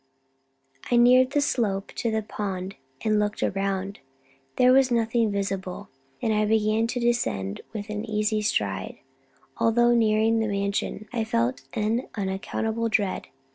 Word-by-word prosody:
I 245 Hz, -, +3 dB
neared 250 Hz, +2 st, +6 dB
the 290 Hz, +1 st, +1 dB
slope 205 Hz, -8 st, -1 dB
to 235 Hz, -, 0 dB
the 220 Hz, -1 st, -1 dB
pond, 195 Hz, -3 st, -4 dB, 0.3 s
and 215 Hz, -1 st, +2 dB
looked 210 Hz, 0 st, -1 dB
down; 195 Hz, 0 st, -2 dB, 0.6 s
there 250 Hz, 0 st, +5 dB
was 265 Hz, -1 st, +5 dB
nothing 230 Hz, -2 st, +1 dB
visible, 195 Hz, -1 st, -3 dB, 0.3 s
and 220 Hz, -, +2 dB
I 215 Hz, 0 st, +2 dB
began 220 Hz, +1 st, +2 dB
to 245 Hz, +1 st, -3 dB
descend 235 Hz, -, -1 dB
with 210 Hz, -2 st, -6 dB
an 210 Hz, 0 st, -3 dB
easy 215 Hz, 0 st, 0 dB
stride. 100 Hz, -, -1 dB, 0.6 s
Although 240 Hz, +1 st, +4 dB
nearing 225 Hz, 0 st, +3 dB
the 220 Hz, -, 0 dB
Mansion, 200 Hz, +1 st, -2 dB
I 230 Hz, -2 st, 0 dB
felt 235 Hz, +3 st, 0 dB
an 225 Hz, +2 st, -1 dB
unaccountable 220 Hz, +3 st, -2 dB
dread. 205 Hz, -3 st, 0 dB
215 Hz, 140 wpm, -25 LUFS, 200-230 Hz, 0.6 s, neared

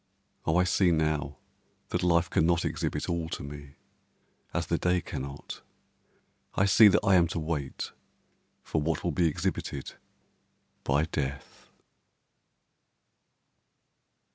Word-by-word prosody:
O 80 Hz, +2 st, +3 dB
I 90 Hz, -, +5 dB
see 90 Hz, +1 st, +3 dB
now 75 Hz, -3 st, 0 dB, 0.5 s
that -, -, -1 dB
life 85 Hz, -1 st, +3 dB
cannot 85 Hz, +1 st, +2 dB
exhibit -, -, -2 dB
all 85 Hz, -2 st, -2 dB
to -, -, -5 dB
me, 70 Hz, 0 st, -9 dB, 0.8 s
as -, -, -1 dB
the -, -, 0 dB
day 90 Hz, 0 st, +2 dB
cannot, 70 Hz, -3 st, -7 dB, 0.9 s
I 95 Hz, -, +3 dB
see 105 Hz, +2 st, +8 dB
that 100 Hz, -, +3 dB
I 95 Hz, -, +5 dB
am 85 Hz, -2 st, +5 dB
to 85 Hz, -, -3 dB
wait 75 Hz, -4 st, -3 dB, 0.7 s
for 80 Hz, -, -1 dB
what 80 Hz, +2 st, -1 dB
will 85 Hz, -, 0 dB
be 85 Hz, +2 st, +2 dB
exhibited 70 Hz, -2 st, -3 dB, 0.9 s
by 70 Hz, +3 st, +2 dB
death. 70 Hz, -3 st, -5 dB
80 Hz, 120 wpm, -29 LUFS, 70-90 Hz, 0.9 s, see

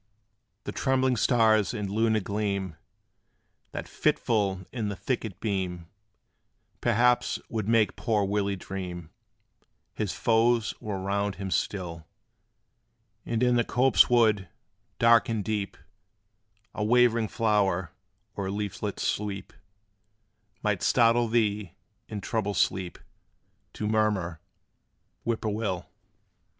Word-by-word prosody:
The -, -, -4 dB
trembling 130 Hz, -1 st, +1 dB
stars 110 Hz, -3 st, +3 dB
and 105 Hz, -3 st, -3 dB
lunar 110 Hz, +2 st, +1 dB
gleam, 100 Hz, -3 st, -2 dB, 1.0 s
That -, -, -5 dB
fitful 100 Hz, -5 st, 0 dB
in 110 Hz, -5 st, -2 dB
the 100 Hz, -, -4 dB
thicket 110 Hz, -4 st, -3 dB
beam, 90 Hz, -6 st, -3 dB, 0.9 s
Perhaps 120 Hz, +1 st, +3 dB
would 110 Hz, -3 st, -3 dB
make 115 Hz, -2 st, +3 dB
poor 105 Hz, -4 st, 0 dB
Willie 100 Hz, 0 st, 0 dB
dream 90 Hz, -3 st, -6 dB, 0.8 s
His 105 Hz, -4 st, -2 dB
foes 115 Hz, +3 st, +2 dB
were 105 Hz, -3 st, -4 dB
round 100 Hz, +1 st, -1 dB
him 95 Hz, -1 st, -5 dB
still. 85 Hz, -6 st, -2 dB, 1.2 s
And 115 Hz, +1 st, 0 dB
in 125 Hz, -1 st, +4 dB
the 120 Hz, -, +3 dB
copse 130 Hz, +3 st, +4 dB
wood, 110 Hz, -7 st, +3 dB, 0.5 s
dark 115 Hz, -2 st, +5 dB
and 110 Hz, -3 st, -1 dB
deep, 105 Hz, -2 st, -2 dB, 1.0 s
A 105 Hz, -, -2 dB
waving 115 Hz, 0 st, +4 dB
flower, 100 Hz, -6 st, +1 dB, 0.4 s
or 100 Hz, -1 st, -3 dB
leaflet's 100 Hz, 0 st, -3 dB
sweep 100 Hz, -2 st, -3 dB, 1.1 s
Might 105 Hz, -4 st, 0 dB
startle 120 Hz, 0 st, +4 dB
thee, 105 Hz, -5 st, 0 dB, 0.4 s
in 105 Hz, -2 st, -5 dB
troubled 105 Hz, -2 st, -2 dB
sleep 90 Hz, +1 st, 0 dB, 0.8 s
To 105 Hz, -, -3 dB
murmur, 105 Hz, -6 st, 0 dB, 0.9 s
"Whip 115 Hz, -1 st, -1 dB
poor 110 Hz, -2 st, -1 dB
will!" 105 Hz, -4 st, -2 dB
105 Hz, 110 wpm, -27 LUFS, 95-115 Hz, 1.2 s, dark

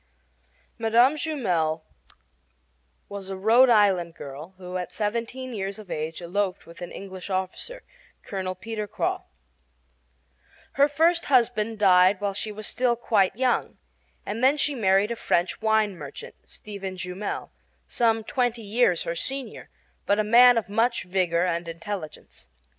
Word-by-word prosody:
Mme. 235 Hz, +4 st, +4 dB
Jumel 180 Hz, -, -1 dB, 1.2 s
was 200 Hz, -1 st, -8 dB
a 195 Hz, -, -4 dB
Rhode 230 Hz, +6 st, +5 dB
Island 190 Hz, -7 st, +3 dB
girl 145 Hz, +7 st, -9 dB
who 180 Hz, 0 st, -6 dB
at 180 Hz, -, -5 dB
seventeen 235 Hz, +4 st, -3 dB
years 195 Hz, -1 st, -4 dB
of 210 Hz, -4 st, -11 dB
age 160 Hz, +3 st, -4 dB
eloped 185 Hz, +2 st, -2 dB
with 170 Hz, +1 st, -14 dB
an 175 Hz, -, -6 dB
English 190 Hz, -1 st, -8 dB
officer, 190 Hz, -, -4 dB, 0.4 s
Colonel 185 Hz, -2 st, -4 dB
Peter 220 Hz, -1 st, -5 dB
Croix. -, -, -1 dB, 1.5 s
Her 280 Hz, +1 st, +4 dB
first 330 Hz, +4 st, +2 dB
husband 230 Hz, -4 st, +2 dB
died 185 Hz, -1 st, +5 dB
while 200 Hz, -1 st, -1 dB
she 215 Hz, +2 st, -4 dB
was 210 Hz, +1 st, -7 dB
still 245 Hz, +1 st, +1 dB
quite 205 Hz, -5 st, +1 dB
young, 255 Hz, 0 st, 0 dB, 0.5 s
and 220 Hz, +4 st, -4 dB, 0.2 s
she 290 Hz, -, +2 dB
then 250 Hz, -, -6 dB
married 195 Hz, +2 st, +3 dB
a -, -, -1 dB
French 175 Hz, -4 st, 0 dB
wine 220 Hz, -2 st, +2 dB
merchant, 145 Hz, -5 st, -9 dB
Stephen 195 Hz, -3 st, -8 dB
Jumel, 180 Hz, +3 st, -5 dB, 0.4 s
some 225 Hz, -2 st, +1 dB
twenty 245 Hz, -1 st, -1 dB
years 205 Hz, -4 st, +2 dB
her 170 Hz, -, -3 dB
senior, 270 Hz, +8 st, -5 dB, 0.4 s
but 200 Hz, -, +3 dB
a 215 Hz, -, +2 dB
man 240 Hz, +3 st, +7 dB
of 230 Hz, -, -1 dB
much 230 Hz, +4 st, +1 dB
vigor 180 Hz, -2 st, +1 dB
and 170 Hz, -1 st, -2 dB
intelligence. 165 Hz, -, -7 dB
205 Hz, 140 wpm, -25 LUFS, 185-235 Hz, 1.5 s, man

